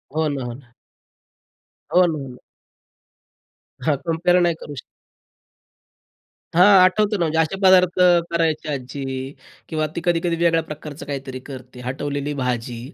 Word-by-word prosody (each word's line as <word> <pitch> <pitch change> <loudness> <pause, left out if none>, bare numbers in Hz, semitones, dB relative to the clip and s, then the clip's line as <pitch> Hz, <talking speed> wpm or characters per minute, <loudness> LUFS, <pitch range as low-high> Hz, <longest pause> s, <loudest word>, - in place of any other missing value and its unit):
हो 160 0 +1
ना, 140 -3 -3
हो 120 -1 -5
ना. 125 -1 -16 1.2
हो 180 0 +6
ना, 165 -3 -1
हो 135 -2 -6
ना. 125 -1 -12 1.5
हां, 150 - +3
कम्पेअर 175 +2 +2
नाही 170 -1 +2
करू 145 - -8
शकत. 130 - -8 1.7
हां, 185 +2 +7
आठवतं 205 +3 +2
ना. 170 - +2
म्हणजे 160 0 -1
असे 160 +3 +1
पदार्थ 185 -1 +5 0.3
करायची 165 -2 0
आज्जी 135 -1 -5 0.7
किंवा 155 -1 -1
ती - - -3
कधी-कधी 170 -1 +1
वेगळ्या 165 -1 +2
प्रकारचं 150 0 -8
काहीतरी 135 -2 -5
करते. 130 -2 -10
हटवलेली 145 +2 -3
भाजी 125 -3 -3
155 Hz, 140 wpm, -21 LUFS, 135-170 Hz, 1.7 s, हां